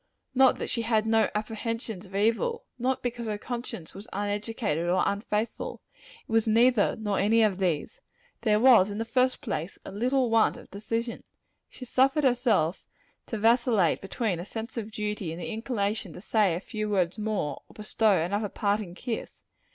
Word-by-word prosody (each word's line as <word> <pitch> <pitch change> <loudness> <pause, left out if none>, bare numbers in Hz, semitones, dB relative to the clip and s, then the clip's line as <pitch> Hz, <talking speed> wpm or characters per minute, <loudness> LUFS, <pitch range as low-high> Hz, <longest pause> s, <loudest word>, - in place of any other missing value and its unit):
Not 265 0 +5
that - - -4
she 230 - -1
had 220 -1 +1
no 225 0 +3
apprehensions 220 -2 -4
of 195 - -11
evil. 230 - +1
Not 255 +2 0
because 240 -1 -3
her 210 -1 -2
conscience 235 -7 -6
was 200 +3 -10
uneducated, 205 -4 -2
or 185 +1 +3
unfaithful. 210 +2 -2 0.5
It - - -11
was 225 0 +3
neither, 230 0 +4
nor 205 -3 -1
any 225 +3 +4
of 200 -3 +1
these. 185 - -1 0.4
There 210 -2 +3
was, 230 -5 +7
in 205 - -5
the 225 - -2
first 255 +2 +1
place, 195 - -4
a - - -7
little 245 +4 +1
want 225 -1 +3
of - - -14
decision. 230 +4 -3 0.5
She 255 - -10
suffered 270 +4 +2
herself 240 - +2 0.4
to 225 - -3
vacillate 225 -4 +3
between 195 -2 -2
a - - -4
sense 225 +3 -6
of 225 -3 -4
duty 210 -5 -3
and 165 - -7
the 180 - -5
inclination 215 -5 -2
to - - -10
say 210 -5 +2
a - - -2
few 215 +2 -4
words 190 0 0
more, 210 -8 -2
or - - -18
bestow 210 -1 +2
another 200 +6 -1
parting 200 -3 -1
kiss. 235 +3 -5
215 Hz, 175 wpm, -27 LUFS, 200-235 Hz, 0.5 s, was